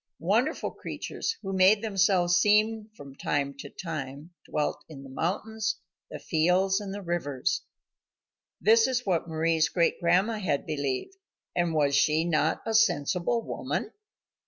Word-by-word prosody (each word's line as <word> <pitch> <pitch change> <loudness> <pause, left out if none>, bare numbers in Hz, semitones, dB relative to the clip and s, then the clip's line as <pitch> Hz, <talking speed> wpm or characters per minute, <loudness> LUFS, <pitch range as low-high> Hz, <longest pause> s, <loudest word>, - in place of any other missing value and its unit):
Wonderful 225 - 0
creatures 360 -2 -5
who 195 -1 -4
made 190 +3 +5
themselves 190 -4 +2
seen 215 +2 +3
from 140 -1 -11
time 140 0 -1
to 140 - -7
time 150 0 -7 0.2
dwelt 150 - -1
in 140 -3 -10
the 135 - -11
mountains, 215 +8 -2 0.3
the - - -6
fields, 180 +4 +2
and 200 -2 -6
the 200 0 -6
rivers. 155 -7 -1 1.0
This 225 +6 +5
is 255 -1 -1
what 175 -3 0
Mari's 160 0 +1
great 170 -2 +1
grandma 185 +6 +2
had 145 -8 -1
believed, 140 - -3 0.4
and 175 -2 0
was 145 -2 +2
she 155 +3 +3
not 165 -3 +1
a 225 - -2
sensible 220 +1 +2
woman? - - -3
175 Hz, 140 wpm, -27 LUFS, 155-210 Hz, 1.0 s, made